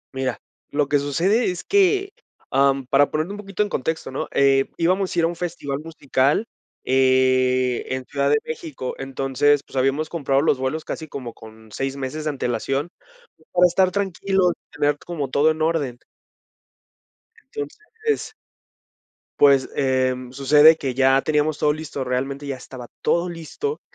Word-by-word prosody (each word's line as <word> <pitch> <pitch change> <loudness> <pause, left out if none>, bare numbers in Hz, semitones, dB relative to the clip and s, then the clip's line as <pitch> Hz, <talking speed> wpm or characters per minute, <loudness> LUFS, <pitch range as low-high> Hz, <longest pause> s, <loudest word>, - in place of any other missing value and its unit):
Mira, 130 -2 -2 0.3
lo 145 -1 0
que 145 - +3
sucede 180 - +1
es 180 -1 -4
que, 395 0 +2 0.4
ah, 140 0 +4
mm, 135 -1 -7
para 140 +2 +3
ponerme 155 +5 -2
un 205 - -7
poquito 200 0 -2
en 205 - -4
contexto, 160 0 -3
¿no? 130 - -3
Eh, 135 -1 +4
Íbamos 185 +3 +1
a 175 - +2
ir 165 - +3
a - - +3
un 170 - -4
festival 160 -5 -4
musical, 145 +3 0 0.4
eh, 130 -1 +3
en 130 -1 -3
Ciudad 140 -1 0
de 150 - +4
México, 155 -5 -5
entonces, 135 +2 +1
pues, - - -16
habíamos 135 +4 +1
comprado 140 -4 +1
los 145 -4 +2
vuelos 140 +4 -2
casi 160 - -5
como 125 -5 -7
con 110 0 -15
6 135 +4 -3
meses 140 +3 -4
de - - +1
antelación, 135 +2 -2 0.6
para 180 0 +5
estar 185 +2 +2
tranquilos 190 -2 +1
y - - -76
tener 145 0 +2
como 155 -6 -5
todo 150 +3 +4
en 155 - -5
orden. 150 -7 0 1.4
Entonces 435 0 -5 1.1
pues, 140 -2 +5
em, 130 -2 0
sucede 145 +4 +6
que 135 -4 -3
ya 135 +1 +4
teníamos 150 0 +1
todo 150 0 +2
listo, 155 -3 -5
realmente 135 +3 -3
ya 140 - -3
estaba 125 -1 -10
todo 175 +1 +1
listo, 175 - -5
145 Hz, 160 wpm, -22 LUFS, 130-165 Hz, 1.4 s, sucede